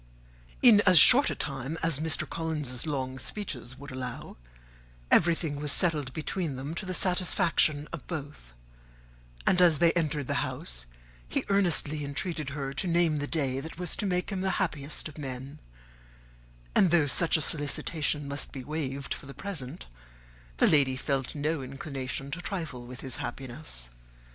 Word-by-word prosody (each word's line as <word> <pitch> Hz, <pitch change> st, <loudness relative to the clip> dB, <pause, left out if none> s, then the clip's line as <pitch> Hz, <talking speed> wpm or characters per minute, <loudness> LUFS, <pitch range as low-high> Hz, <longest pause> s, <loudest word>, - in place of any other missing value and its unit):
In 225 Hz, -5 st, +8 dB
as 185 Hz, -2 st, +7 dB
short 265 Hz, -, +9 dB
a -, -, -2 dB
time 140 Hz, +1 st, -4 dB
as 165 Hz, -4 st, +2 dB
Mr. 160 Hz, 0 st, 0 dB
Collins's 155 Hz, -5 st, -3 dB
long 130 Hz, -3 st, -3 dB
speeches 125 Hz, -, -4 dB
would 140 Hz, +1 st, -10 dB
allow, 130 Hz, -1 st, -6 dB, 0.8 s
everything 165 Hz, -3 st, +3 dB
was 150 Hz, -1 st, 0 dB
settled 150 Hz, -7 st, +3 dB
between 155 Hz, +1 st, -3 dB
them 135 Hz, +4 st, -5 dB
to 185 Hz, +3 st, -4 dB
the 185 Hz, -, -2 dB
satisfaction 175 Hz, -5 st, +2 dB
of 170 Hz, -, -7 dB
both; 145 Hz, -, -7 dB, 0.9 s
and 180 Hz, -1 st, +4 dB
as 170 Hz, -4 st, +6 dB
they 170 Hz, +1 st, +5 dB
entered 155 Hz, -4 st, -1 dB
the -, -, 0 dB
house, -, -, -4 dB, 0.4 s
he -, -, -1 dB
earnestly 170 Hz, -6 st, +1 dB
entreated 150 Hz, +1 st, -3 dB
her 135 Hz, -1 st, -4 dB
to 180 Hz, -, -2 dB
name 170 Hz, -3 st, +2 dB
the 145 Hz, -, -2 dB
day 135 Hz, -5 st, 0 dB
that 160 Hz, +4 st, -8 dB
was 180 Hz, -1 st, 0 dB
to 205 Hz, -, -1 dB
make 180 Hz, 0 st, -1 dB
him 190 Hz, -2 st, -2 dB
the 190 Hz, -, 0 dB
happiest 150 Hz, -6 st, -2 dB
of 155 Hz, 0 st, -11 dB
men; 135 Hz, +1 st, -6 dB, 1.1 s
and 185 Hz, -, +5 dB
though 165 Hz, -3 st, +4 dB
such 160 Hz, +4 st, +3 dB
a -, -, -2 dB
solicitation 145 Hz, +1 st, -1 dB
must 140 Hz, +1 st, -1 dB
be 130 Hz, -, -7 dB
waived 140 Hz, -2 st, -3 dB
for -, -, -10 dB
the 140 Hz, -, -10 dB
present, 140 Hz, -, -5 dB, 0.7 s
the -, -, +5 dB
lady 140 Hz, -4 st, +4 dB
felt 135 Hz, 0 st, -2 dB
no 150 Hz, +1 st, -1 dB
inclination 135 Hz, 0 st, -5 dB
to 170 Hz, +5 st, -4 dB
trifle 155 Hz, -11 st, -5 dB
with 125 Hz, 0 st, -8 dB
his 130 Hz, -3 st, -2 dB
happiness. 120 Hz, -, -7 dB
150 Hz, 165 wpm, -29 LUFS, 135-170 Hz, 1.1 s, short